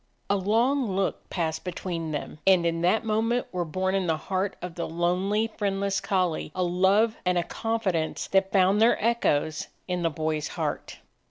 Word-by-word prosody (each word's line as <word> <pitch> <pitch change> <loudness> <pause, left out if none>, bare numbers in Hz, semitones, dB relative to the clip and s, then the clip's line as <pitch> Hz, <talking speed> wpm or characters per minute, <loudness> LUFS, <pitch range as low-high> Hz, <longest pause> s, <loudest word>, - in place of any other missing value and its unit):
A - - +4
long 225 +3 +1
look 195 0 -2
passed 160 -3 -2
between 175 -2 -4
them, 150 0 -5
and 185 -3 +5
in 165 0 0
that 185 +6 +2
moment 225 +3 +1
were 180 -1 -1
born 185 +4 -1
in 190 -2 0
the 160 -1 +1
heart 190 +4 -2
of 180 -1 -6
the 170 - -4
lonely, 185 +6 0
friendless 200 -1 0
collie 180 -5 0
a 185 - 0
love 190 +5 +3
and 180 -1 +1
a 175 - +2
confidence 195 -7 -2
that 195 0 +2
found 195 +2 +4
their 230 +2 +5
echoes 155 -9 +1 0.2
in 180 -1 -1
the 165 - +2
boy's 155 -1 -2
heart. - - -4
185 Hz, 175 wpm, -26 LUFS, 170-205 Hz, 0.2 s, and